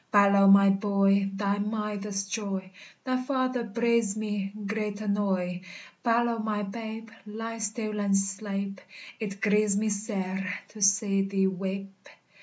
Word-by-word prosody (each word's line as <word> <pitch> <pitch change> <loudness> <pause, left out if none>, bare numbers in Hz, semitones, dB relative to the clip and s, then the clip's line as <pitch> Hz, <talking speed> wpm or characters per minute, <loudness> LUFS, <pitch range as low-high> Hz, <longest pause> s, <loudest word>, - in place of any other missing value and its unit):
Balow, 200 -1 +6
my 195 0 +8
boy, 195 0 +2
thy 200 +1 -1
mither's 210 -1 -2
joy! 195 -3 -3 0.3
Thy 255 -1 0
father 255 -2 0
breides 230 -1 +1
me 205 -2 -2
great 210 0 -2
annoy. 195 -4 -1 0.4
_Balow, 235 -1 +2
my 210 -1 -1
'babe, 220 +2 -6 0.2
ly 225 +2 -5
stil 215 0 -3
and 200 -1 +2
sleipe! 195 0 -3 0.4
It 200 -3 -4
grieves 210 -1 +3
me 215 +1 +1
sair 195 -2 -2 0.2
to 215 - -11
see 200 0 +4
thee 195 0 +1
weipe. 195 +1 -4
205 Hz, 130 wpm, -28 LUFS, 195-220 Hz, 0.4 s, my